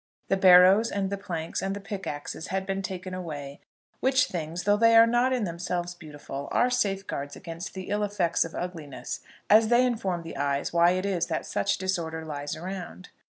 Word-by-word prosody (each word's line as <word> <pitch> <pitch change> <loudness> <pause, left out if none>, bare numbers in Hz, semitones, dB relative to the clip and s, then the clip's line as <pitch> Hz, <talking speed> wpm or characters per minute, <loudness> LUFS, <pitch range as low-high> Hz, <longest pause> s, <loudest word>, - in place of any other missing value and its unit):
The - - +3
barrows, 190 +4 +7
and 195 -1 -2
the 200 - -1
planks, 165 -5 -4
and 195 0 -2
the - - -5
pickaxes 190 -7 -6
had 190 0 -2
been 195 0 -2
taken 185 -1 -5
away, 145 -6 -6 0.4
which 265 0 +3
things, 170 -2 -4
though 205 0 +4
they 230 +2 +5
are 225 0 +9
not 240 +2 +2
in 250 -3 0
themselves 175 0 -3
beautiful, 145 -4 -8
are 250 +1 +2
safeguards 195 - -2
against 170 +2 -8
the 190 - -5
ill 205 +1 0
effects 195 -5 +1
of 165 - -8
ugliness, 165 -6 -5 0.3
as 220 +1 +6
they 240 +2 +4
inform 195 -8 -1
the 165 -4 -8
eyes 140 +2 -1
why 170 +1 +5
it 185 +1 -2
is 180 -4 0
that 160 -2 -2
such 200 - 0
disorder 165 -4 -2
lies 145 -2 -4
around. 185 +1 -7
185 Hz, 190 wpm, -27 LUFS, 165-200 Hz, 0.4 s, are